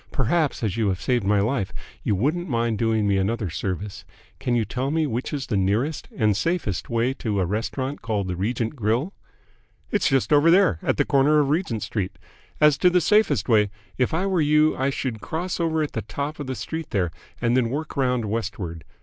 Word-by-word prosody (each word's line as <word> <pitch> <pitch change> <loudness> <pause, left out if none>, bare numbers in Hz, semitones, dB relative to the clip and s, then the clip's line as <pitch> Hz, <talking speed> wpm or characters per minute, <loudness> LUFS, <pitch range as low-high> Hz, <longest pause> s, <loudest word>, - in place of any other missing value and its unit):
Perhaps, 145 +1 0
as 105 -1 -1
you 110 -2 +1
have 95 -2 0
saved 125 -3 0
my 100 +1 +3
life, 105 -1 0 0.3
you 105 - 0
wouldn't 155 - 0
mind 115 -3 0
doing 110 -2 +1
me 100 -1 +2
another 100 -1 -1
service. 95 +3 -4 0.4
Can 125 -2 0
you 115 -2 +1
tell 130 +6 -2
me 160 +1 +1
which 125 -2 -3
is 140 -3 -3
the 110 - -2
nearest 105 +11 0
and 105 -4 +3
safest 140 - -1
way 115 +3 +1
to 110 -6 -2
a 95 - +2
restaurant 130 +8 -3
called 105 -4 -2
the 90 - -2
Regent 115 - -2
Grill?" 120 - 0 0.8
"It's 205 - +2
just 135 +2 +2
over 145 +3 +6
there, 180 - +4
at - - 0
the - - +2
corner 140 +2 +4
of 145 -2 +2
Regent 150 - -1
Street. 105 -4 -3 0.4
As 150 -2 +5
to 180 - +5
the 180 0 +3
safest 210 - +3
way, 105 -4 +4 0.3
if 125 - +2
I 170 +4 0
were 190 -4 +1
you 150 +1 +4
I 135 +1 0
should 125 -5 -3
cross 175 +3 -3
over 160 -2 +1
at 150 - -3
the 110 - -2
top 140 +8 -5
of 145 - -5
the 130 - -3
street 160 +3 -5
there 90 -4 0 0.3
and 120 +1 +1
then 125 -3 +2
work 150 +5 -4
round 125 -4 +1
westward. 100 -6 -4
120 Hz, 210 wpm, -24 LUFS, 105-150 Hz, 0.8 s, over